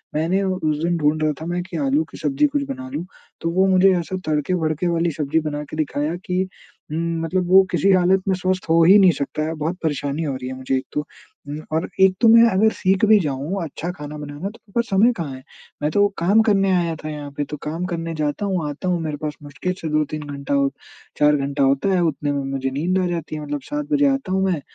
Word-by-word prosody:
मैंने 170 +5 +1
उस 185 -6 0
दिन 170 0 +1
ढूँढ 155 0 +1
रहा 155 - +2
था 160 - -5
मैं 175 +1 -2
कि 185 - -7
आलू 285 +2 +1
की - - -10
सब्ज़ी 290 +2 +2
कुछ 290 0 -1
बना 265 -1 -6
लूँ 175 - -3 0.4
तो 165 - -1
वो 190 +2 +3
मुझे 190 0 +5
ऐसा 185 +3 -4
तड़के-भड़के 155 +2 0
वाली 170 0 +1
सब्ज़ी 150 +1 0
बना 150 -1 -3
के 150 - -9
दिखाया 155 +1 -1
कि 180 +1 0 0.5
उम, 165 +1 -2
मतलब 180 +1 -1
वो 190 +1 +8
किसी 195 - +3
हालत 185 +1 +3
में 190 - +2
स्वस्थ 185 0 -1
हो 165 +1 +5
ही 190 +5 +8
नहीं 185 -2 +7
सकता 145 -1 -3
है। 160 - -2
बहुत 160 +4 -3
परेशानी 145 0 -1
हो 140 -3 -2
रही 125 -1 -6
है - - -5
मुझे 130 0 -1
एक 130 - -4
तो 150 - 0 0.5
उम, 150 +1 -4
और 160 +2 0
एक 190 -1 +6
तो 230 - +6
मैं 230 +1 +7
अगर 215 +4 +3
सीख 190 +2 +2
भी 215 0 +6
जाऊँ 155 +4 -2
अच्छा 165 +3 -5
खाना 150 0 -7
बनाना 150 +4 -6
तो 220 - -15
मेरे - - -21
पास 235 0 0
समय 205 +5 +4
कहाँ 145 -6 -4
है? 130 - -12 0.4
मैं 150 - 0
तो 205 +3 +4
काम 195 +6 +4
करने 195 -3 +3
आया 170 -2 0
था 155 - -4
यहाँ 145 -1 -6
पे 145 - 0
तो 150 - -6
काम 165 +4 -3
करने 165 -2 -3
जाता 150 +5 -1
हूँ, 180 -6 -1
आता 145 +6 -5
हूँ 175 -1 +1
मेरे 155 -2 -3
पास 150 0 -4
मुश्किल 145 +6 -4
से 160 - -3
2-3 155 0 -1
घंटा 140 -1 -4
हो 140 -1 +3 0.5
4 150 0 +4
घंटा 140 0 -1
होता 135 +7 +2
है 180 - +2
उतने 145 -3 -1
में 140 -1 -2
मुझे 135 -1 -1
नींद 175 +7 0
आ 180 - 0
जाती 165 -3 -4
है। 155 - -5
मतलब 145 -1 -4
7 295 0 -2
बजे 285 -1 +4
आता 270 -8 -2
हूँ 190 0 +1
मैं, 175 -6 0
165 Hz, 245 wpm, -21 LUFS, 150-190 Hz, 0.5 s, वो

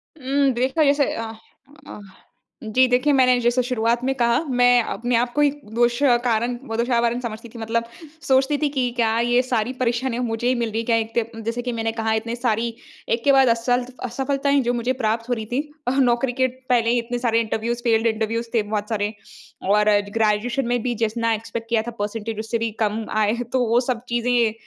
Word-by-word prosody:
उम, 275 -1 +1
देखो 260 +6 +1
जैसे 285 -1 +2
अ 225 -1 -4 0.6
अ, - - -9 0.6
जी 250 +4 +3
देखिए 250 +4 +2
मैंने 255 -2 +4
जैसे 240 +1 +2
शुरुआत 235 -1 0
में 265 +1 +1
कहा 235 -2 +2 0.2
मैं 245 0 +6
अपने 245 +2 -2
आप 240 +1 +1
को 295 - +1
ही 290 - +5 0.2
दोष 240 +1 +2 0.2
कारण 240 +1 0
वो 225 - -3
दोषारोपण 235 0 +1
समझती 230 -1 -6
थी - - -7
मतलब 225 +1 -1 0.4
सोचती 270 +2 +3
थी 295 0 0
कि 250 -1 +2
क्या 225 -1 +1
ये 245 +1 +4
सारी 240 +1 0
परेशानियाँ 245 0 0
मुझे 225 +1 -2
ही 255 - +2
मिल 235 -1 -1
रही 220 - -2
है - - -8
क्या 230 - +2
एक 225 0 -3 0.2
त 225 - -7
जैसे 230 +2 -2
कि 245 - -3
मैंने 225 0 -1
कहा 220 0 +1
इतनी 230 +1 -4
सारी 235 -1 -1 0.4
एक 230 0 0
के 280 - +5
बाद 270 -1 +5
असल 245 +2 +1 0.2
असफलताएँ 275 +3 0
जो 245 - +2
मुझे 240 +2 -1
प्राप्त 225 +2 -1
हो - - +2
रही 220 -2 -4
थी 245 +6 -1 0.3
अ, - - +3
नौकरी 245 0 +2
के 260 - +5
पहले 250 -2 0
ही 240 - +3
इतने 240 +1 -4
सारे 230 0 +3
इंटरव्यूज़ 230 +2 -3
फेल्ड 230 -1 +2
इंटरव्यूज़ 225 +1 -1
थे 230 - +3
बहुत 210 0 -3
सारे। 210 -1 -1 0.6
और 210 +1 +3 0.3
ग्रेजुएशन 225 +4 +1
में 245 -1 0
भी 245 0 -1
जितना 230 +1 0
एक्सपेक्ट 225 +1 -5
किया 230 -2 +2
था 240 - -5
परसेंटेज 215 +1 -4
उससे 225 +2 -2
भी 230 0 -1
कम 220 0 0 0.2
आए 210 0 +2 0.2
तो 260 - +2
वो 235 +1 +4
सब 245 -2 -2
चीज़ें 240 -2 +1
235 Hz, 210 wpm, -22 LUFS, 225-250 Hz, 0.6 s, मैं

